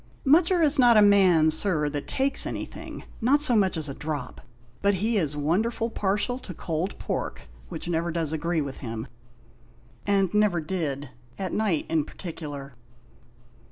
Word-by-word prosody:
Mutcher 335 +5 +4
is 295 -2 +2
not 240 -3 +6
a - - +8
man, 185 -6 +5
Sir, 160 -2 +1
that 145 -1 -5
takes 270 +1 +2
anything, - - -7 0.2
not 265 +6 +4
so 290 -5 +3
much 190 -5 +2
as 155 -1 -2
a 140 - -5
drop; 145 -3 -5 0.4
but 200 0 +3
he 220 +5 0
is 150 -6 -1
wonderful 220 +10 0
partial 210 +5 -1
to 185 -8 -9
cold 165 +5 -3
pork, - - -4 0.3
which - - -6
never 170 0 -1
does 160 -2 -2
agree 165 +1 0
with 140 -2 -5
him, 115 -3 -5 1.0
and 195 -2 +2
never 210 -4 +3
did, 150 -5 -3 0.3
at 190 -2 -4
night 205 -8 0
in 160 -2 +1
partic'lar." 145 -5 -8
175 Hz, 160 wpm, -26 LUFS, 155-215 Hz, 1.0 s, a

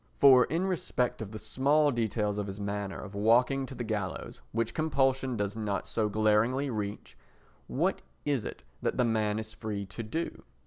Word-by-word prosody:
For 130 -3 +8
in 170 +4 0
respect 145 -11 -1
of 105 -2 -5
the 110 - -6
small 140 +7 +3
details 105 -3 0
of 105 - -2
his 100 +1 -6
manner 100 -1 -3
of 100 - -8
walking 125 +6 +3
to 130 - -8
the 120 - -3
gallows, 105 -5 -4
which 115 0 -1
compulsion 135 -5 +1
does 100 0 -1
not 105 -3 -2
so 110 -2 0
glaringly 110 +6 +2
reach, 105 -2 -4 0.5
what - - 0 0.2
is 140 -6 +1
it - - -7 0.2
that - - -1
the 125 - +4
man 110 -2 +1
is 110 0 -5
free 105 -3 -4
to 95 +5 -7
do? 160 +10 -4
110 Hz, 180 wpm, -30 LUFS, 105-130 Hz, 0.5 s, For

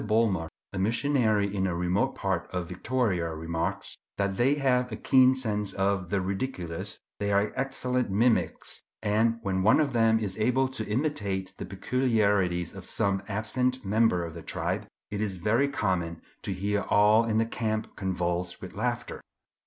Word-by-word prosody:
Bulmer, 105 -6 +1 0.2
a 95 - -3
missionary 110 -2 +1
in 95 -1 +1
a 90 - -1
remote 90 +3 0
part 95 -3 -2
of 90 -2 -3
Victoria, 90 -4 -1
remarks, 80 +1 -3 0.2
"that 100 -1 0
they 130 +7 +3
have 125 -3 +1
a - - -3
keen 130 +3 +5
sense 105 -6 -1
of 95 -2 0
the 100 - +1
ridiculous; 95 -4 -3 0.2
they 100 0 0
are 100 +1 +2
excellent 125 -2 -1
mimics, 115 +4 +1 0.2
and 110 +2 +2
when 95 -2 0
one 110 +9 +5
of 145 -3 +1
them 115 -1 +4
is 105 -2 -3
able 125 +4 +2
to 130 -4 -3
imitate 105 -7 -1
the - - -5
peculiarities 100 -6 +1
of - - -9
some 100 -1 0
absent 125 +4 0
member 105 -4 +2
of 80 - -7
the 85 - -8
tribe, - - -2 0.2
it 105 0 -2
is 100 -3 -1
very 110 +10 +2
common 90 -11 -1 0.2
to - - -3
hear 100 +2 0
all 105 +2 +5
in 110 -1 0
the 115 - +3
camp 110 -1 -3
convulsed 90 -2 -2
with 95 - -9
laughter." 120 +3 -3
105 Hz, 165 wpm, -28 LUFS, 95-120 Hz, 0.2 s, keen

